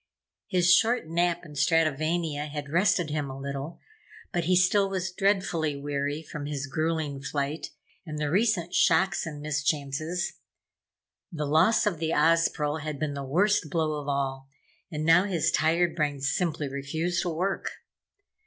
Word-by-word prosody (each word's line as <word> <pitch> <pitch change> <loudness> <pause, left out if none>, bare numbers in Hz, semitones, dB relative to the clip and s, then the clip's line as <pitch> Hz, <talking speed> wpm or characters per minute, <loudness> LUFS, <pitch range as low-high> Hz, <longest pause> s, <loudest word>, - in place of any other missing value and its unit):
His 180 -3 +4
short 225 -2 +3
nap 175 +1 0
in 150 - -11
Stratovania 155 0 +1
had 145 -1 -6
rested 175 -2 +2
him 150 -2 -2
a 135 - -7
little, 140 +3 -5 0.5
but 175 -2 0
he 185 +2 +3
still 195 +2 +3
was 190 -1 -2
dreadfully 185 -6 0
weary 145 +2 -3
from 150 -2 -6
his 145 -1 -3
gruelling 155 -1 -2
flight 145 +2 -3 0.3
and 155 -4 -6
the 150 -1 -1
recent 190 -3 +1
shocks 175 +1 +3
and 150 -2 -7
mischances. 150 +3 -2 0.9
The 150 -3 -3
loss 160 +11 +4
of 185 -7 0
the 160 0 -1
Ozpril 155 -1 +2
had 155 -1 -4
been 150 -1 -2
the 140 0 -5
worst 180 +5 +2
blow 155 -2 -1
of 145 - -10
all 135 -1 -2 0.4
and 155 -2 -3
now 170 +4 +6
his 180 -6 +1
tired 165 +2 +2
brain 145 -3 -1
simply 150 +2 -1
refused 160 +6 -2
to 180 - -2
work. 185 +4 -2
160 Hz, 155 wpm, -27 LUFS, 145-175 Hz, 0.9 s, now